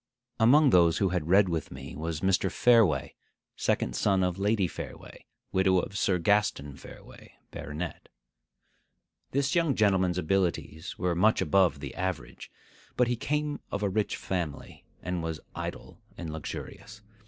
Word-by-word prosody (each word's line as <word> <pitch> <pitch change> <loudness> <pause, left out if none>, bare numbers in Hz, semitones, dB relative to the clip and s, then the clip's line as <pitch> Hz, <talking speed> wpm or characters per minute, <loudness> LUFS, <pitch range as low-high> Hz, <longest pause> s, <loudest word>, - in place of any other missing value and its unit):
Among 140 +6 +6
those 85 -3 +5
who 95 - +2
had 90 -3 -2
read 95 +2 +5
with 80 -4 -2
me 65 +1 -9
was 80 0 -4
Mr. 95 0 +2
Fareway, 115 -9 +3 0.4
second - - 0
son 95 -2 +2
of 90 +1 -1
Lady 100 -1 +2
Fareway, - - -9 0.2
widow 95 0 +3
of 90 +2 -2
Sir 95 -2 +1
Gaston 85 -6 +1
Fareway, - - -14 0.2
baronet. 75 +2 -6 1.2
This 140 +2 0
young 165 -6 +2
gentleman's 95 -4 +2
abilities 90 -2 -1
were 90 -1 0
much 105 +6 +3
above 95 -3 +2
the - - -6
average; 95 -4 -5 0.5
but 125 -1 +3
he 120 - +1
came 150 +4 -2
of 100 - -3
a 100 - +1
rich 105 +2 -1
family, 85 -6 -5 0.2
and 90 -1 -2
was 80 -1 -4
idle - - -7 0.2
and 80 -3 -6
luxurious. 105 +7 -8
95 Hz, 145 wpm, -28 LUFS, 85-105 Hz, 1.2 s, Among